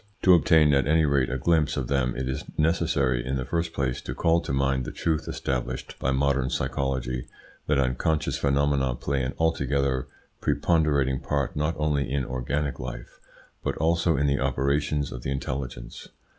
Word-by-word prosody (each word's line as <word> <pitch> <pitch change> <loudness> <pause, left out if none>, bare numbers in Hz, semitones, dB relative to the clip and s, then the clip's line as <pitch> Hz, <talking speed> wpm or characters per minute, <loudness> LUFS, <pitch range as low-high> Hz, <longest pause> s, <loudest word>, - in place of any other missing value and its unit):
To 95 - +7
obtain 80 -3 +5
at 70 -1 +2
any 80 +1 +4
rate 70 -3 +2
a 65 - -1
glimpse 80 +2 +2
of 65 -3 -2
them 65 -2 0
it 65 0 -2
is 65 - -3
necessary 75 -6 +1
in 65 +2 -2
the 65 -1 -2
first 85 +1 -1
place 65 -5 -2
to - - -6
call 85 0 +2
to - - -5
mind 65 -1 +1
the - - -5
truth 80 -2 -1
established 65 0 -3
by 65 - 0
modern 70 -1 +1
psychology, 65 -1 -2 0.4
that 75 - +2
unconscious 70 +4 0
phenomena 70 -2 +1
play 70 +2 -2
an 65 +1 -2
altogether 70 -5 0 0.3
preponderating 70 -6 +1
part 70 -2 -2
not 75 +2 0
only 75 -3 0
in 70 -2 0
organic 65 +4 -2
life, - - -7 0.4
but - - -2
also 85 0 +2
in 70 - +1
the 70 -1 +1
operations 70 +2 0
of 60 - -6
the 65 - -4
intelligence. 65 -2 -5
70 Hz, 170 wpm, -26 LUFS, 65-75 Hz, 0.4 s, To